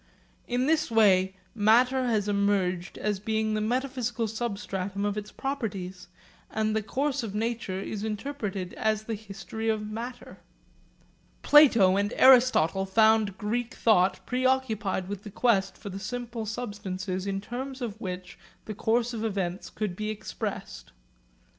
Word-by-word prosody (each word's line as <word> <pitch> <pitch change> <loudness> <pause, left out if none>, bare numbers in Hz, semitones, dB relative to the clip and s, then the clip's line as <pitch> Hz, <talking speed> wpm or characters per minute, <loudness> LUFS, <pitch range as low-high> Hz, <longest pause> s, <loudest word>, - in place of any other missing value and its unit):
In 245 +1 0
this 310 +1 +2
way 190 -4 +4 0.2
matter 245 +4 +4
has 215 -4 +1
emerged 200 -3 0
as 210 -2 -1
being 220 +1 -1
the 215 - 0
metaphysical 245 -1 -1
substratum 200 -3 -3
of 205 -1 0
its 210 0 -5
properties, 195 -10 -4 0.4
and 215 0 0
the 220 - +1
course 275 +6 -1
of 215 -3 -5
nature 220 -4 -2
is 205 +1 -5
interpreted 210 -5 -4
as 215 -1 0
the 225 - -4
history 210 +1 -5
of 215 -1 0
matter. 230 +4 -7 1.0
Plato 230 -11 +7
and 205 +2 0
Aristotle 240 -8 +5
found 220 -1 +3
Greek 235 +5 -2
thought 190 -4 +3
preoccupied 250 -7 0
with 200 -1 -5
the 210 - -9
quest 205 -2 +1
for 205 - -8
the 195 - -6
simple 235 +1 -5
substances 195 -4 -4
in 195 0 -1
terms 260 +6 -6
of 225 -4 -5
which 180 -1 -6 0.3
the 215 - -5
course 235 +3 0
of 225 -1 -4
events 190 -4 -2
could 210 -5 -3
be 215 +2 -3
expressed. 205 - -5
215 Hz, 140 wpm, -28 LUFS, 195-240 Hz, 1.0 s, Plato